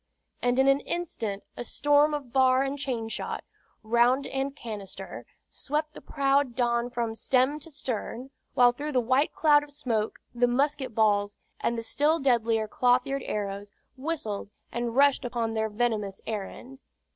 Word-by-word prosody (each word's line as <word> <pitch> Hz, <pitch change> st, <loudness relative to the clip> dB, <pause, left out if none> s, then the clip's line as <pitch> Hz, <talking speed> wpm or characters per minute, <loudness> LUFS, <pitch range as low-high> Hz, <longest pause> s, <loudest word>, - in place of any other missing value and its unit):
and 245 Hz, 0 st, +1 dB
in 265 Hz, +1 st, +4 dB
an 275 Hz, 0 st, +5 dB
instant 230 Hz, -, -4 dB
a -, -, -5 dB
storm 290 Hz, +3 st, +3 dB
of 275 Hz, -5 st, -7 dB
bar 260 Hz, 0 st, +4 dB
and 275 Hz, +1 st, -3 dB
chainshot, 235 Hz, -5 st, -3 dB, 0.4 s
round 240 Hz, +4 st, +3 dB
and 270 Hz, +1 st, -3 dB
canister, 210 Hz, -7 st, -8 dB, 0.2 s
swept 305 Hz, +2 st, -3 dB
the -, -, -11 dB
proud 275 Hz, -3 st, +1 dB
Don 240 Hz, -1 st, +1 dB
from 235 Hz, -2 st, -2 dB
stem 260 Hz, +5 st, +1 dB
to 330 Hz, -, -9 dB
stern, 260 Hz, -2 st, -5 dB, 0.2 s
while 245 Hz, -2 st, +6 dB
through 290 Hz, +5 st, -5 dB
the 255 Hz, -, +4 dB
white 260 Hz, +5 st, +2 dB
cloud 295 Hz, -2 st, +4 dB
of 295 Hz, -, -11 dB
smoke 235 Hz, -7 st, -2 dB, 0.2 s
the 245 Hz, 0 st, +3 dB
musket 270 Hz, 0 st, 0 dB
balls, 205 Hz, -2 st, +2 dB, 0.2 s
and 235 Hz, -, 0 dB
the 230 Hz, -, -3 dB
still 300 Hz, +7 st, +2 dB
deadlier 230 Hz, -5 st, +2 dB
clothyard 250 Hz, +4 st, +2 dB
arrows, 205 Hz, -1 st, -3 dB, 0.3 s
whistled 260 Hz, -9 st, -3 dB, 0.2 s
and 235 Hz, 0 st, -3 dB
rushed 280 Hz, 0 st, +4 dB
upon 235 Hz, -2 st, -2 dB
their 220 Hz, 0 st, 0 dB
venomous 210 Hz, -3 st, -1 dB
errand. 225 Hz, +5 st, -6 dB
250 Hz, 155 wpm, -27 LUFS, 225-280 Hz, 0.4 s, while